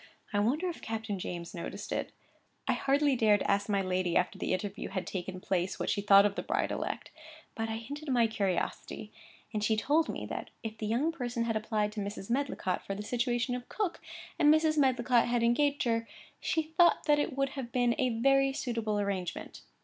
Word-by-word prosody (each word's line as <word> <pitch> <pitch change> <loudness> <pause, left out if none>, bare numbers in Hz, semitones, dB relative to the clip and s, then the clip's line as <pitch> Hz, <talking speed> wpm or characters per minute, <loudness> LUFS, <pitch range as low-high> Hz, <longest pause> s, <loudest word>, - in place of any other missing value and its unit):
I 205 - +2
wonder 275 - +1
if 345 - -5
Captain 220 -3 -3
James 175 +1 -5
noticed 170 -3 -6
it. - - -2 0.6
I - - +3
hardly 280 0 +2
dared 215 -4 +4
ask 200 +1 +1
my 200 -1 +2
lady, 185 -1 +1
after 180 - 0
the - - -2
interview 200 +2 -3
had 185 -2 -3
taken 185 0 -5
place, 185 0 -1
what - - 0
she 205 - 0
thought 200 0 +7
of 205 - +2
the - - -3
bride - - -1
elect; - - -4 0.4
but 225 -3 -3
I 220 - -2
hinted 285 +7 -6
my 245 -3 +4
curiosity, 210 0 -2 0.4
and 210 -1 -1
she 220 0 +2
told 300 +9 +2
me, - - -4
that - - -5
if 220 -1 -4
the 215 - -2
young 255 +9 +1
person 245 -6 -2
had 230 -1 -1
applied 215 -1 0
to 210 - -6
Mrs. 200 +1 -5
Medlicott, 255 -8 -1
for 195 - -4
the 205 - -5
situation 240 +2 0
of 245 0 -5
cook, 410 -5 -2 0.4
and 295 -1 +7
Mrs. 310 0 +4
Medlicott 250 -4 +3
had 240 -1 +1
engaged 285 +5 +2
her, 230 -2 0 0.3
she 320 - 0
thought 325 +2 +4
that 295 -1 +4
it 280 -2 -1
would 275 0 +1
have 265 -3 -6
been 245 0 +2
a 255 - +3
very 275 +4 +3
suitable 230 -5 -1
arrangement. 195 -4 -3
230 Hz, 205 wpm, -31 LUFS, 205-270 Hz, 0.6 s, thought